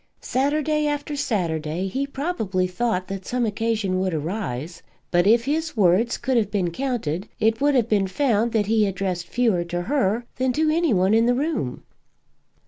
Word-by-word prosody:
Saturday 300 +3 +1
after 290 0 -2
Saturday 170 - -1
he 270 +8 -2
probably 245 - -1
thought 185 0 -1
that 195 -1 -5
some 245 +4 -1
occasion 215 -3 -1
would 185 -3 0
arise; 165 - -4 0.3
but, 175 +2 +3
if 230 +2 +4
his 305 0 -2
words 200 +4 +3
could 255 +1 0
have 215 -4 +1
been 190 -5 -1
counted, 215 - -3
it 225 +1 +1
would 290 0 +3
have 240 -3 +3
been 205 -4 +2
found 235 0 +1
that 220 -2 +1
he 215 0 +2
addressed 185 -2 -3
fewer 225 -8 +1
to 175 +1 -3
her 235 -2 0
than 255 0 +1
to 310 +3 +2
any 330 -2 +2
one 190 0 +3
in 225 +1 +4
the 245 - +3
room. 275 - -2
220 Hz, 175 wpm, -23 LUFS, 185-265 Hz, 0.3 s, if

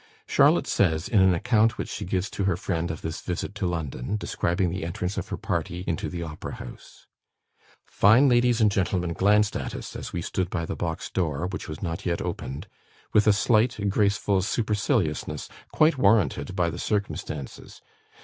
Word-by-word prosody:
Charlotte - - +4
says, 80 -4 +1
in 105 -5 +3
an 95 -1 +5
account 110 +3 +2
which - - -3
she - - -5
gives 95 +2 -1
to 100 - -3
her 95 -3 +1
friend 85 -3 -2
of 80 - -5
this 80 0 -4
visit 90 +3 -4
to 100 -3 -2
London, 80 +1 -3
describing 90 -3 -1
the 90 0 -4
entrance 90 +2 -3
of - - -4
her - - -3
party 90 +1 -3
into 85 - -2
the 85 -2 -4
Opera 75 -2 -6
house: 60 - -12 0.8
"Fine 120 +7 +5
ladies 120 -1 +3
and 105 -2 +5
gentlemen 90 -3 0
glanced 105 +4 +3
at - - -4
us, - - -7
as - - -6
we 85 - -3
stood 95 0 -2
by 85 -3 -2
the - - -4
box 80 -2 -4
door, 80 -3 -1
which 90 -2 -5
was 75 +3 -7
not 85 -2 -3
yet 85 -2 -1
opened, 65 +2 -5 0.5
with 105 0 +4
a - - +8
slight, 110 +3 +2
graceful 100 -1 +2
superciliousness, 105 - -1 0.2
quite 155 -2 +3
warranted 100 - +2
by 85 -3 +1
the - - -7
circumstances. 100 -9 -4
95 Hz, 180 wpm, -26 LUFS, 85-105 Hz, 0.8 s, a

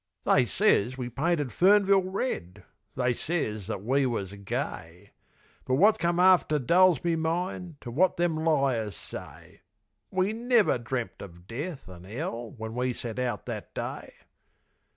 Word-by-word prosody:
They - - +3
ses 125 +6 +2
we 125 -2 -4
painted 150 +1 0
Fernville 195 - +4
red; 105 - -3 0.3
They 125 -1 +1
ses 110 - -3
that 100 -3 -4
we 135 +4 +2
was 100 -5 -3
gay; 95 -2 -5 0.5
But 130 - +1
wot 205 +9 +5
come 170 +1 +1
after 180 -4 +5
dull's 170 +4 +4
me 170 -1 +1
mind 170 +1 -2
To 120 - -7
wot 180 +10 +2
them 175 -2 +1
liars 135 - +1
say. - - -10 0.5
We 190 +3 0
never 235 - +2
dreamed 120 0 -4
of 85 -3 -11
death 140 - -6
an' 90 0 -12
'ell 120 - -4
When 110 0 -6
we 125 +1 -1
set 115 0 -6
out 120 -5 -2
that - - -7
day. - - -5
130 Hz, 150 wpm, -28 LUFS, 110-175 Hz, 0.5 s, wot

